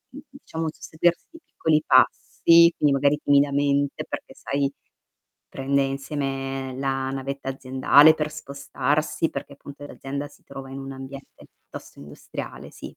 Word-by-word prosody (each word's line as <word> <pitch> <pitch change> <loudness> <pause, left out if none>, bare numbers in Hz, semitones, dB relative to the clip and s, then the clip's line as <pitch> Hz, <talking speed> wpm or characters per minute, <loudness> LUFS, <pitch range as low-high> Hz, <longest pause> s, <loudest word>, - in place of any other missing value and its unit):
un, 285 - -8
diciamo, 165 - -7
un - - -1
susseguirsi 170 +2 -1
di 330 - -13
piccoli 155 -1 +1
passi, 170 +5 +5
quindi 145 - +3
magari 140 +2 +2
timidamente, 140 0 +2
perché - - -7
sai, 140 0 -1 0.8
prende 140 +1 0
insieme 135 -1 -3
la 135 -1 -1
navetta 135 0 -4
aziendale 135 +3 +5
per 150 -1 -3
spostarsi, 150 +1 -2
perché - - -7
appunto 140 0 -11
l'azienda 140 +1 -6
si 145 - -22
trova 135 -1 -9
in 135 - -7
un 135 0 -7
ambiente 135 +1 -11
piuttosto - - -12
industriale, 75 +1 -9
sì. - - -11
140 Hz, 140 wpm, -24 LUFS, 135-150 Hz, 0.8 s, passi